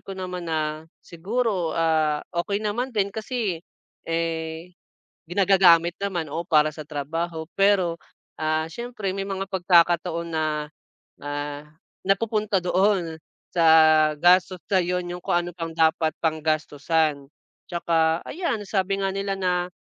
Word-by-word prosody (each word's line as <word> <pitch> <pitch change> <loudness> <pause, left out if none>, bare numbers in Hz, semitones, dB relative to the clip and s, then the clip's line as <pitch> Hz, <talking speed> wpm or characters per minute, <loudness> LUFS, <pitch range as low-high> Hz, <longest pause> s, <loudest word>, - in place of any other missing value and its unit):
ko 195 - -6
naman 180 -1 -5
na 155 -1 -2 0.2
siguro, 190 0 -2
ah, 155 -2 +2 0.2
okey 200 0 -2
naman 240 +5 -2
din 200 -2 +1
kasi, 215 -5 -3 0.5
eh, 165 +1 -3 0.6
ginagagamit 175 -3 +5
naman 175 -5 -2
o 170 - -3
para 155 -3 +3
sa 155 - -7
trabaho 160 +3 -4
pero, 195 -4 +3 0.5
ah, 155 0 0
siyempre 235 -2 -4
may 195 - -2
mga 195 0 -3
pagkakataon 175 -2 +2
na, 155 0 0 0.8
ah, 145 0 -4 0.4
napupunta 210 +1 +1
doon 180 -2 +1 0.4
sa 170 - +3 0.6
gastos, 180 +1 +4
sa 195 - +3
yun 180 0 -2
yung 180 0 -6
kung - - 0
ano 175 0 -3
pang 165 -1 -5
dapat 160 0 +2
pang 160 -1 0
gastusan. 155 -1 0 0.4
Tsaka 165 -1 +1
ayan 300 - -2
sabi 195 -1 0
nga 195 0 0
nila 195 0 -2
na, 180 -1 0
175 Hz, 130 wpm, -24 LUFS, 160-195 Hz, 0.8 s, ginagagamit